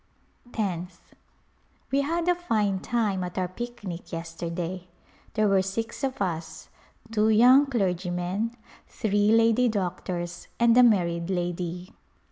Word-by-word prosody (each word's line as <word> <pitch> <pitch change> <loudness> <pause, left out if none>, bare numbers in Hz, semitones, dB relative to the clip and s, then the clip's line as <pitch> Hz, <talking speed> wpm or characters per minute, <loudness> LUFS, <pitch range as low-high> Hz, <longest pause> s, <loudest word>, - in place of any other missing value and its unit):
Tenth. 180 -4 -4 0.8
We 275 +1 +3
had 335 +4 -1
a 355 - +5
fine 215 - 0
time 210 -4 0
at 180 +1 -6
our 185 -1 0
picnic 195 -3 -7
yesterday. 170 +2 -5 0.5
There 215 -1 +3
were 195 -1 +4
six 225 +7 -4
of 265 -1 -2
us; 165 -3 -5 0.4
two 215 -1 +2
young 250 +6 +6
clergymen, 190 -1 -1 0.3
three 205 -1 +1
lady 230 +2 +4
doctors 180 -3 -3
and 235 -1 +5
a 250 - +8
married 175 -7 +3
lady. 175 0 -3
195 Hz, 120 wpm, -26 LUFS, 175-230 Hz, 0.8 s, a